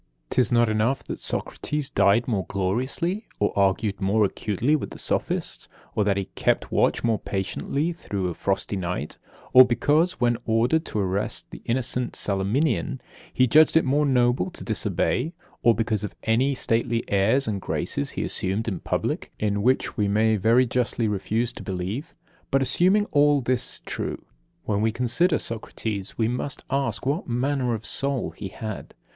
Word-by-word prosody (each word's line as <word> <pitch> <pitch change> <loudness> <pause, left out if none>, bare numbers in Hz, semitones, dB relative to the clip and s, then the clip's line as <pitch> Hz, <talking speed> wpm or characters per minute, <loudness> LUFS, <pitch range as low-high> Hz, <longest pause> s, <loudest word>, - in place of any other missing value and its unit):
'Tis 125 -4 +2
not 120 -1 +4
enough 110 +5 0
that - - -6
Socrates 150 -2 -3
died 100 +4 +3
more 100 -8 -1
gloriously 130 - -2
or 105 - +1
argued 100 +1 +1
more 105 +2 +3
acutely 110 +8 0
with 150 - -3
the - - -10
sophists; - - -2 0.3
or 105 - +1
that 100 -1 +1
he 100 - -1
kept - - 0
watch - - +2
more 115 -2 +1
patiently 140 - -2
through 100 - -3
a 90 - -3
frosty 100 +3 -2
night; 90 -5 -4 0.3
or 130 - +11
because, 150 +8 +2
when 120 -1 0
ordered 120 +9 +2
to - - -5
arrest 100 +1 -2
the - - -9
innocent 125 +1 0
Salaminian, 125 +8 0 0.3
he 130 - +3
judged 155 +6 +5
it 160 - +3
more 145 +3 +2
noble 120 -7 +2
to - - -8
disobey; 165 - -1 0.3
or 120 -1 +5
because 110 -2 -1
of 105 - -5
any 130 +5 +2
stately 115 0 0
airs 110 +7 +3
and 100 -3 -2
graces 70 - -2
he - - -3
assumed 100 +5 -2
in 95 -6 -2
public, - - -2
in 100 -1 0
which 130 +4 +1
we 105 -2 +2
may 110 +2 +3
very 115 +5 +4
justly 120 -1 0
refuse 110 +4 -1
to - - -9
believe. 95 - -4 0.3
But, 135 0 +2
assuming 185 +10 +3
all 145 0 +4
this 125 -1 +2
true, - - -4 0.4
when 105 -1 -1
we 110 +1 +2
consider 130 - +2
Socrates, 110 -3 -4
we 110 - +2
must 125 +4 -3
ask 135 -1 -1
what 145 +7 -1
manner 125 0 0
of 110 0 -8
soul 135 +1 -1
he 100 - -7
had. 110 +2 -7
115 Hz, 165 wpm, -25 LUFS, 100-135 Hz, 0.4 s, or